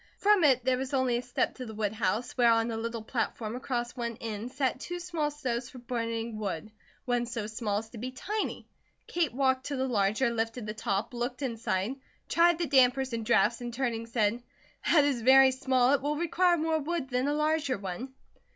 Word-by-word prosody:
From 410 -3 +4
it 260 -4 +4
there 255 -1 +2
was 265 +1 -2
only 255 -2 +2
a - - -2
step 245 0 -1
to 255 - -7
the 220 - -8
woodhouse, 215 +1 -1
where 240 -2 +5
on 225 0 +2
a - - -3
little 230 0 -4
platform 225 -1 -3
across 240 -2 -3
one 235 -2 -4
end 225 +1 -5
sat 260 -2 -1
two 350 +5 -5
small 340 -4 -1
stoves 260 -4 -3
for - - -12
burning 230 -2 -3
wood, 205 0 -4 0.3
one 245 -2 0
so 230 -3 -3
small 215 -1 -2
as 220 +1 -5
to 230 - -9
be 250 +3 -4
tiny. 410 +12 -4 0.4
Kate 335 -5 0
walked 260 0 +1
to 285 - -2
the 265 0 -1
larger, 215 +2 +1
lifted 225 0 -2
the 210 - -4
top, 210 0 -2
looked 245 +4 -3
inside, 230 -1 -2 0.3
tried 345 0 +4
the 345 - 0
dampers 265 -2 +3
and 230 -1 -2
drafts 235 0 +3
and 240 0 -4
turning 235 -3 -2
said: 230 0 0 0.5
"That 305 -4 +6
is 270 -5 0
very 265 +2 +7
small. 260 0 +2
It 285 - +2
will 295 +2 -1
require 345 +2 +2
more 320 0 +1
wood 310 -2 -3
than 250 +2 +1
a 290 - +1
larger 300 -4 +1
one." 200 +8 -6
245 Hz, 205 wpm, -29 LUFS, 230-270 Hz, 0.5 s, very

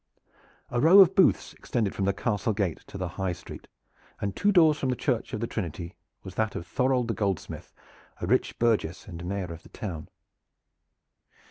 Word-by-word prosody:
A 120 - 0
row 165 +6 +7
of 190 -4 +8
booths 190 - +3
extended 110 -5 -2
from 95 - -1
the 100 - +3
castle 105 +2 -1
gate 95 -5 -1
to - - -8
the 95 -1 -2
high 95 -2 0
street, 85 -1 -11 0.5
and 100 -1 -3
two 205 - +2
doors 160 -5 +5
from 130 - -1
the 125 - +1
Church 125 -2 -1
of 110 - -4
the - - 0
Trinity 85 -6 -5 0.3
was 95 - -8
that 110 +1 -1
of 85 - -5
Thorold 125 +2 +1
the 115 - 0
goldsmith, 100 -5 -3 0.5
a - - -3
rich - - +1
burgess 110 -8 0
and 85 -2 -8
Mayor 90 -2 -3
of 85 - -11
the - - -17
town. 85 -7 -6
100 Hz, 190 wpm, -27 LUFS, 90-125 Hz, 0.5 s, of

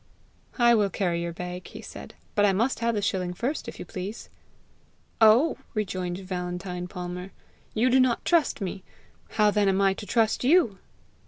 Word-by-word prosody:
"I 240 -1 +5
will 210 -3 +3
carry 175 -2 -1
your 170 0 -3
bag," 180 +1 -6
he - - -10
said, - - -10 0.2
"but 205 - +2
I 200 -1 +4
must 230 +7 +1
have 230 0 0
the 205 - -1
shilling 180 -2 -1
first, 260 - -3
if - - -7
you - - -7
please." 190 +6 -6 0.9
"Oh!" 230 +8 +5 0.2
rejoined 185 -4 -2
Valentine 180 -1 -4
Palmer. 180 +1 -6 0.4
"You 240 +3 +3
do 260 - +5
not 255 -2 +2
trust 335 -9 +2
me! 190 0 -4 0.5
How 210 -1 +4
then 205 -1 +2
am 190 0 +2
I 195 -1 +4
to 205 +1 -9
trust 225 0 +1
you?" 260 - +4
200 Hz, 175 wpm, -26 LUFS, 180-230 Hz, 0.9 s, I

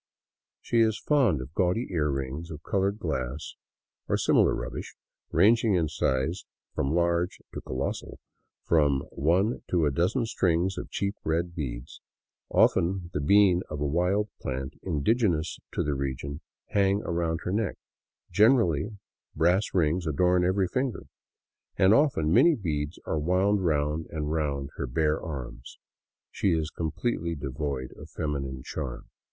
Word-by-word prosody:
She 115 - +1
is 110 -2 +3
fond 125 - +2
of 65 +4 -9
gaudy 95 +8 0
earrings 75 -1 -2
of 80 -1 -8
colored 100 -1 0
glass 70 - -3 0.6
or - - +2
similar - - +3
rubbish, - - -6 0.4
ranging 110 0 +4
in 80 -3 +1
size 75 +5 -1 0.3
from 70 +4 0
large 85 +1 +1
to - - -5
colossal; 65 +1 -4 0.5
from 70 -4 +3
one 90 - +1
to 85 -3 +2
a 75 - +2
dozen 90 - +1
strings 90 -3 +1
of - - -7
cheap 100 0 -2
red 85 +2 -1
beads, 65 -5 -6 0.5
often 90 0 +2
the 75 - -1
bean 95 +2 +5
of 75 - -5
a 75 - -1
wild 90 +8 +1
plant 65 +2 -4
indigenous 85 - 0
to - - 0
the 75 - -1
region, 70 +2 -4 0.3
hang 100 +1 +2
around 85 -1 -1
her - - -2
neck; 105 0 0 0.6
generally 105 - +3 0.4
brass 90 +6 +2
rings 85 0 +1
adorn 90 +4 +3
every 95 +1 +2
finger; 130 +4 -2 0.7
and 95 +2 +5
often 115 - +3
many 155 - +6
beads 80 - -3
are 80 - -1
wound 95 +5 +2
round 75 -1 0
and 75 -1 -3
round 70 -3 -1
her 70 - -2
bare 75 +4 +1
arms. 65 -5 -7 0.5
She 95 - +1
is 80 -1 -1
completely 85 +1 -2
devoid 70 -2 -4
of - - -11
feminine 70 -3 -4
charm. 65 -6 -5
85 Hz, 140 wpm, -27 LUFS, 75-95 Hz, 0.7 s, many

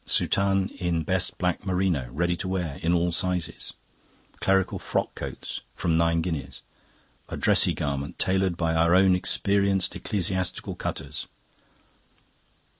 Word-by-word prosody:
"Soutane 95 0 +2
in 85 -3 0
best 95 +2 0
black 90 -1 -1
merino. 90 -9 0
Ready 85 +6 0
to 95 - -3
wear; 90 -6 -2
in 85 - +1
all 85 0 +2
sizes. 90 -2 0 0.7
Clerical 95 -1 +2
frock - - -1
coats. - - -6
From 85 -2 0
nine 85 0 +2
guineas. 70 -7 -4 0.7
A - - -4
dressy - - +4
garment, 70 0 -3
tailored 95 -2 +1
by 85 -1 0
our 85 +2 +4
own 95 0 +6
experienced 100 0 +1
ecclesiastical 95 -2 -2
cutters." - - -5
90 Hz, 125 wpm, -26 LUFS, 85-95 Hz, 0.7 s, own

